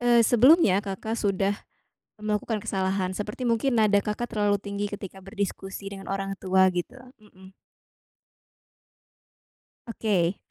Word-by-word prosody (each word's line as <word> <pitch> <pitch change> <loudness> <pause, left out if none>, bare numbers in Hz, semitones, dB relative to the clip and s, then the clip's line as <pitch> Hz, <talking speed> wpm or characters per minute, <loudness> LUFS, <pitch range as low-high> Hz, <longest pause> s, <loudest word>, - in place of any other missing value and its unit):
eee, 240 -1 +5
sebelumnya 245 - +5
Kakak 205 +3 -4
sudah 200 0 0 0.6
melakukan 215 0 -2
kesalahan. 190 -2 -1
Seperti 210 +6 -5
mungkin 240 +2 +1
nada 210 -2 +4
Kakak 210 +4 -4
terlalu 205 -2 +2
tinggi 200 +1 -3
ketika 195 -2 -8
berdiskusi 195 0 -5
dengan 195 -1 -9
orang 195 0 -2
tua 190 0 +3
gitu, 175 +7 -4 0.2
mhm. 190 -3 -17 2.3
Oke. 200 -6 0
205 Hz, 115 wpm, -26 LUFS, 195-220 Hz, 2.3 s, eee